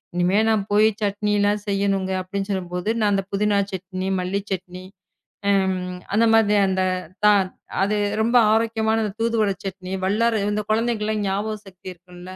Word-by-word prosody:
இனிமே 180 +3 +2
நான் 220 -2 +2
போய் 210 +1 +5 0.2
சட்னி 210 0 -1
எல்லாம் 205 +1 +2
செய்யணுங்க 195 -1 0
அப்படின்னு 195 +2 -4
சொல்லும்போது 180 0 -3
நான் 210 -2 +2
அந்த 195 0 +1
புதினா 205 +1 +1
சட்னி, 185 0 -5
மல்லி 185 +2 -1
சட்னி 185 -1 -5 0.7
அம் 190 -2 +2 0.4
அந்த 230 +2 +4
மாதிரி 210 -2 +4
அந்த 190 0 0 0.4
தா 210 - +7 0.5
அது 205 +2 +1 0.2
ரொம்ப 235 +3 +2 0.2
ஆரோக்கியமான 225 0 +1 0.2
தூதுவள 225 -2 +1
சட்னி, 190 -1 -6
வல்லார 220 +3 +1
இந்த 210 0 -1
குழந்தைகளுக்கு 215 -2 0
ஞாபக 205 +3 -1
சக்தி 185 -1 -16
இருக்கும் 180 0 -15
200 Hz, 145 wpm, -22 LUFS, 190-215 Hz, 0.7 s, தா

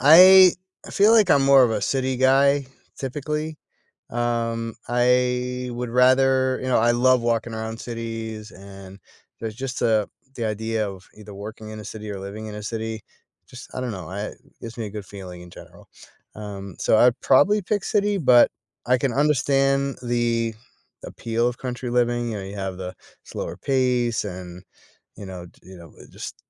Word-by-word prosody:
I 185 +6 +9 0.4
feel 205 +3 +4
like 215 -5 +5
I'm 140 - +5
more 135 -1 +7
of 120 - +3
a 110 - -2
city 130 -1 0
guy, 135 +2 +3 0.3
typically, 150 +3 -4 0.5
um, 115 -1 -2
I 125 +1 +1
would 120 0 -4
rather 130 +1 +3
you 130 - -4
know, 130 - +3
I 120 +1 +3
love 125 +1 +3
walking 115 0 -1
around 110 0 -5
cities, 115 -2 -6
and 95 0 -12 0.4
there's 110 -2 -5
just 130 +2 -5
a 110 -3 +2 0.3
the 120 - -4
idea 110 0 -2
of 95 -1 -12
either 105 -1 -12
working 110 +2 -9
in 110 0 -8
a 105 - -9
city 105 +1 -8
or 100 - -6
living 100 +3 -7
in 105 - -7
a 105 - -7
city 110 0 -4 0.5
just, 125 -1 -12
I - - -3
don't 125 -2 -3
know 90 -6 -7
I 100 +3 -5 0.3
gives 115 0 -8
me 115 - -3
a - - -8
good 105 0 -7
feeling 95 -2 -10
in 90 - -12
general, - - -15 0.5
um, 100 -2 -8
so 110 - +2
I'd 120 +2 +4
probably 200 +10 +4
pick 205 +1 -2
city, 205 -1 +1
but 125 -8 +5 0.3
I 125 +1 +3
can 125 0 -1
understand 140 -1 +2
the 120 -2 0 0.5
appeal 115 +1 -2
of 120 0 -3
country 125 -1 -5
living, 120 -1 0
you 110 - -4
know 100 - -6
you 100 +1 -8
have 95 -2 -4
the 90 -1 -7 0.3
slower 85 - -6
pace 125 -3 0
and, 90 -2 -8 0.5
you 100 - -8
know, 90 -2 -8
d - - -23
you 95 0 -13
know, 85 -2 -14
it - - -15
just - - -8
120 Hz, 180 wpm, -23 LUFS, 105-130 Hz, 0.5 s, I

